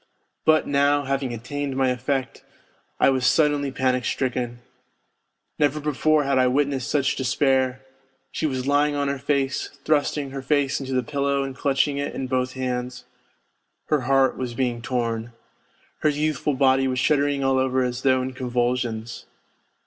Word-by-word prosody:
But 155 Hz, 0 st, +4 dB
now, 145 Hz, 0 st, +2 dB
having 135 Hz, -1 st, -2 dB
attained 135 Hz, +4 st, -4 dB
my 135 Hz, -1 st, +2 dB
effect, 130 Hz, +1 st, -2 dB, 0.6 s
I -, -, +5 dB
was 130 Hz, -1 st, 0 dB
suddenly 145 Hz, +1 st, +2 dB
panic 130 Hz, -1 st, 0 dB
stricken. 125 Hz, -1 st, -2 dB, 1.0 s
Never 150 Hz, 0 st, +2 dB
before 150 Hz, +1 st, +2 dB
had 135 Hz, -1 st, +1 dB
I 130 Hz, -, +4 dB
witnessed 135 Hz, -1 st, 0 dB
such 140 Hz, -2 st, +1 dB
despair! 130 Hz, -1 st, +1 dB, 0.5 s
She 160 Hz, -, -1 dB
was 130 Hz, -3 st, -3 dB
lying 145 Hz, +1 st, +2 dB
on 140 Hz, -1 st, 0 dB
her 140 Hz, -1 st, -2 dB
face, 135 Hz, 0 st, -1 dB, 0.2 s
thrusting 145 Hz, -2 st, 0 dB
her 135 Hz, 0 st, -5 dB
face 140 Hz, 0 st, +1 dB
into 135 Hz, -1 st, -5 dB
the 125 Hz, -1 st, +1 dB
pillow 140 Hz, +1 st, 0 dB
and 135 Hz, -1 st, -5 dB
clutching 140 Hz, +1 st, +1 dB
it 140 Hz, -, -3 dB
in 130 Hz, -, -3 dB
both 130 Hz, 0 st, -1 dB
hands. 125 Hz, -1 st, -4 dB, 0.8 s
Her 150 Hz, -3 st, +2 dB
heart 135 Hz, +1 st, +2 dB
was 125 Hz, -2 st, -4 dB
being 120 Hz, -2 st, -1 dB
torn. 115 Hz, -2 st, -2 dB, 0.7 s
Her 155 Hz, -, +2 dB
youthful 150 Hz, -1 st, -1 dB
body 135 Hz, 0 st, +3 dB
was 130 Hz, -1 st, -1 dB
shuddering 140 Hz, +1 st, +1 dB
all 135 Hz, 0 st, +2 dB
over 130 Hz, 0 st, +1 dB
as 125 Hz, 0 st, -3 dB
though 130 Hz, -1 st, +3 dB
in 130 Hz, 0 st, -4 dB
convulsions. 120 Hz, -2 st, -2 dB
135 Hz, 155 wpm, -24 LUFS, 125-140 Hz, 1.0 s, I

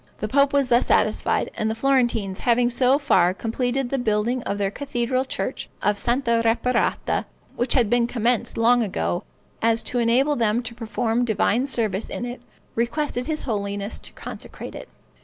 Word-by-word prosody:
The 215 Hz, -, -3 dB
pope 280 Hz, +4 st, +3 dB
was 280 Hz, -2 st, +2 dB
thus 240 Hz, +1 st, +3 dB
satisfied, -, -, +2 dB
and 215 Hz, -, -1 dB
the 220 Hz, -, -2 dB
Florentines 235 Hz, -6 st, +1 dB
having 240 Hz, 0 st, +2 dB
so 255 Hz, +2 st, +3 dB
far 185 Hz, -, +3 dB
completed 245 Hz, +4 st, -2 dB
the 275 Hz, -, 0 dB
building 230 Hz, +2 st, 0 dB
of 200 Hz, -, -2 dB
their 200 Hz, -1 st, 0 dB
cathedral 255 Hz, 0 st, -1 dB
church -, -, -4 dB
of 205 Hz, -1 st, +2 dB
Santa 235 Hz, -1 st, +1 dB
Reparata, 235 Hz, +2 st, +1 dB, 0.3 s
which 245 Hz, -, 0 dB
had 245 Hz, -5 st, +4 dB
been 235 Hz, +2 st, +2 dB
commenced 240 Hz, -1 st, 0 dB
long 240 Hz, +2 st, +4 dB
ago, 85 Hz, -, -1 dB, 0.4 s
as 225 Hz, 0 st, +2 dB
to 245 Hz, -, -1 dB
enable 255 Hz, +6 st, +3 dB
them 230 Hz, 0 st, +1 dB
to 235 Hz, 0 st, -6 dB
perform 230 Hz, +1 st, -1 dB
divine 235 Hz, +2 st, +1 dB
service 220 Hz, -6 st, -1 dB
in 245 Hz, -, -4 dB
it, 245 Hz, 0 st, -6 dB, 0.3 s
requested 245 Hz, +2 st, -1 dB
his 310 Hz, -1 st, -2 dB
holiness 200 Hz, -3 st, -3 dB
to -, -, -9 dB
consecrate -, -, -8 dB
it. -, -, -9 dB
235 Hz, 170 wpm, -23 LUFS, 220-255 Hz, 0.4 s, had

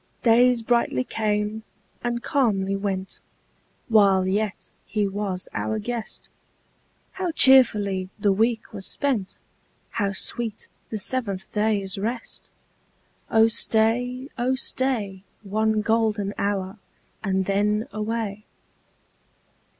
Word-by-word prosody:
Days 240 Hz, 0 st, +5 dB
brightly 235 Hz, -, +1 dB
came 210 Hz, -, -1 dB, 0.4 s
and 240 Hz, 0 st, -2 dB
calmly 200 Hz, -9 st, +1 dB
went, 195 Hz, -1 st, -3 dB, 0.7 s
While 200 Hz, -4 st, +5 dB
yet 200 Hz, +1 st, -1 dB
he 210 Hz, -2 st, -1 dB
was 195 Hz, -2 st, -3 dB
our 220 Hz, -, -1 dB
guest; 230 Hz, +1 st, -5 dB, 0.8 s
How 375 Hz, -2 st, -3 dB
cheerfully 210 Hz, -, +5 dB
the 205 Hz, -1 st, +2 dB
week 225 Hz, +3 st, 0 dB
was 195 Hz, -2 st, -5 dB
spent! 250 Hz, -10 st, -1 dB, 0.5 s
How 200 Hz, -3 st, -1 dB
sweet 225 Hz, +2 st, -4 dB, 0.2 s
the 220 Hz, -, -3 dB
seventh 200 Hz, -3 st, -1 dB
day's 205 Hz, -3 st, 0 dB
rest! 230 Hz, +3 st, -4 dB, 0.8 s
Oh 225 Hz, 0 st, +5 dB
stay, 245 Hz, +4 st, +1 dB
oh 255 Hz, +2 st, +2 dB
stay. 235 Hz, -8 st, -1 dB, 0.2 s
One 215 Hz, +1 st, +1 dB
golden 215 Hz, -2 st, +1 dB
hour, 200 Hz, 0 st, -2 dB, 0.4 s
and 190 Hz, -2 st, 0 dB
then 210 Hz, +3 st, +1 dB
away. 215 Hz, -1 st, -3 dB
215 Hz, 105 wpm, -24 LUFS, 195-230 Hz, 0.8 s, Days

